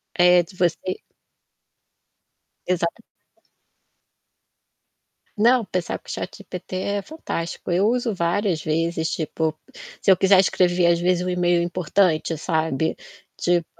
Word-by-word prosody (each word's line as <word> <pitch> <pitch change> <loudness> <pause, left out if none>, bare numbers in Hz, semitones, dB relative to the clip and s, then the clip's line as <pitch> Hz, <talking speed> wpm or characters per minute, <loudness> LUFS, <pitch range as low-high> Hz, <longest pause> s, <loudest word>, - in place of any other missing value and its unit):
é, 180 0 +5
de 185 +3 -16
você 175 -3 +1 1.9
Exatamente. 180 +4 -2 2.3
Não, 235 +2 +4
pensar 180 -3 -3
com - - -26
o - - -6
ChatGPT 180 0 -7
é 200 +2 -1
fantástico. 180 - -5
Eu 190 +4 +3
uso 240 -1 0
várias 175 -1 0
vezes, 160 +1 -1
tipo, 160 0 -2 0.4
se 195 - +4
eu - - +7
quiser 190 0 +5
escrever, 180 -2 +2
às 170 0 +4
vezes, 180 0 +1
um - - -1
e-mail 175 -1 +2
importante, 175 -2 +1
sabe, 160 -2 -1 0.4
tipo, 175 -1 +1
175 Hz, 115 wpm, -23 LUFS, 170-190 Hz, 2.3 s, eu